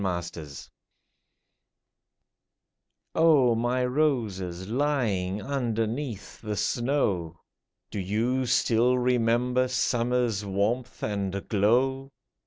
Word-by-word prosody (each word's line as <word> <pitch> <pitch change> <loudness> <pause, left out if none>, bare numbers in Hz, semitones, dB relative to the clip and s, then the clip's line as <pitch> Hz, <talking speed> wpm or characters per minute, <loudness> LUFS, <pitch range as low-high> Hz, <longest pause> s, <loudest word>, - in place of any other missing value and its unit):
WINTER 85 -4 -3 2.7
O 150 -7 +5
MY 120 +2 0
roses, 110 - -1
lying 110 -7 0
underneath 120 -2 -3
the 105 -2 -3
snow! 100 - 0 0.5
Do - - -4
you 115 +7 0
still 120 +1 +3
remember 125 +1 +2
summer's 120 -3 0
warmth 105 +6 -2
and 100 -2 -2
glow 130 +6 +2
115 Hz, 75 wpm, -27 LUFS, 100-125 Hz, 2.7 s, O